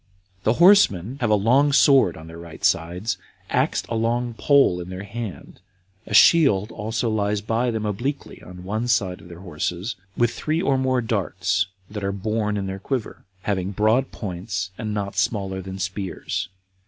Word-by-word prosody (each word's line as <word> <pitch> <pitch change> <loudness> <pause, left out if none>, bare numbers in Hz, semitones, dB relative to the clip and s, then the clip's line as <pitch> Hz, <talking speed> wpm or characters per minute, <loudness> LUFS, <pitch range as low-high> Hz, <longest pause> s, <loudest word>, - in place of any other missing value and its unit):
The 110 - +4
horsemen 135 - +4
have 120 - +1
a 105 - +5
long 130 +8 +3
sword 135 - +5
on 80 - -10
their 80 +1 -10
right 85 -2 -7
sides, 90 +6 0 0.3
axed - - +1
a - - -4
long 120 +2 0
pole 135 -8 +3
in 90 - -8
their 95 +1 -6
hand; 105 -1 -7 0.5
a 105 - -6
shield 110 - +5
also 110 +2 -2
lies 105 -1 0
by 115 +3 0
them 110 -2 -2
obliquely 120 +8 -4
on 90 0 -11
one 110 +5 -2
side 95 -5 0
of 85 - -14
their 85 +1 -11
horses, 90 +4 -3 0.2
with 120 -1 +3
three 155 +6 -2
or 140 -6 +2
more 130 -1 +1
darts 95 -4 0 0.2
that 105 -1 -7
are 100 - 0
borne 105 +1 -1
in 100 - -2
their 95 0 -5
quiver, 125 +1 -4 0.2
having 95 -1 -1
broad 110 +6 +2
points, 95 -1 -4
and 110 +1 -4
not 100 -2 -3
smaller 95 -1 -1
than 95 0 -7
spears. 95 -1 -4
105 Hz, 175 wpm, -23 LUFS, 95-120 Hz, 0.5 s, a